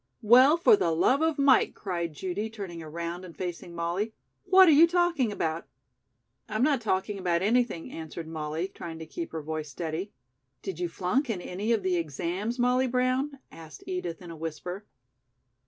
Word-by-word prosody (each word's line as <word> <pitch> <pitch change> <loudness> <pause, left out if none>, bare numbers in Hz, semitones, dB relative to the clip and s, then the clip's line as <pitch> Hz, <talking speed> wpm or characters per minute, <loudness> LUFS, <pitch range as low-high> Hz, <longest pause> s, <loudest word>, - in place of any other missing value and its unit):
"Well, 255 +8 +7
for 380 +6 +6
the 285 - 0
love 175 - +3
of 320 -1 +1
Mike," 275 -2 +4
cried 170 -5 -3
Judy, 190 +6 -3
turning 195 -6 -7
around 170 +3 -5
and 175 -3 -11
facing 175 -1 -5
Molly. 175 +6 -2 0.3
"What 375 0 +7
are - - +7
you 310 +3 +7
talking 345 -9 +1
about?" 165 -4 -2 0.8
"I'm 215 +3 0
not 280 -3 +3
talking 200 -1 -1
about 175 -1 0
anything," 225 -5 +1
answered 160 0 -7
Molly, 160 +2 -3
trying 165 -4 -8
to 160 - -7
keep 335 - -6
her 160 - -5
voice 155 0 -4
steady. 165 +7 -4 0.5
"Did 190 -4 -5
you 175 -1 -1
flunk 190 - 0
in 210 -5 -1
any 195 +5 -3
of 220 -4 +2
the 185 -1 +1
exams., 175 - -3
Molly 250 +1 +2
Brown?" 255 +3 0
asked 160 -3 -12
Edith 180 -1 -4
in 175 - -9
a - - -8
whisper. 165 +5 -6
185 Hz, 175 wpm, -28 LUFS, 170-250 Hz, 0.8 s, Well